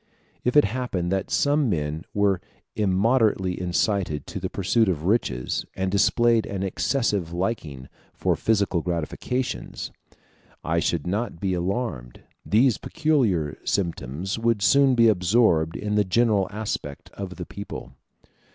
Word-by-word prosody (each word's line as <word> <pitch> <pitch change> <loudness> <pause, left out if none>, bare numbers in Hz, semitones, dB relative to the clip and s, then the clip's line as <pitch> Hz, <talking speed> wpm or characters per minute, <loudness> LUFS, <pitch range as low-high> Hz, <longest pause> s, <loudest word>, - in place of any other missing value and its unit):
If 125 +4 +2
it 150 - +8
happened 100 -6 -2
that 95 0 -1
some 145 -2 +2
men 75 -3 -2
were 100 -3 +1 0.3
immoderately 100 -2 +2
incited 90 -4 0
to - - -6
the - - -3
pursuit 105 +3 +1
of 80 -4 -1
riches, 85 - 0
and 95 0 -1
displayed 115 +3 +3
an 95 -1 -3
excessive 100 -3 0
liking 85 - -3 0.2
for - - 0
physical 100 -5 +1
gratifications, 90 +10 -3 0.7
I 80 +1 +1
should 85 -2 -1
not 100 0 -2
be 95 0 -1
alarmed; 90 - -3 0.2
these 115 +2 +3
peculiar 120 - 0
symptoms 85 - -2
would 115 -3 +1
soon 135 +5 +5
be 115 -1 +5
absorbed 90 -5 +3
in 105 0 -3
the 105 0 +3
general 105 0 +2
aspect 105 -9 -5
of 95 -2 -6
the 90 - -6
people. 100 -11 -8
100 Hz, 135 wpm, -24 LUFS, 85-115 Hz, 0.7 s, it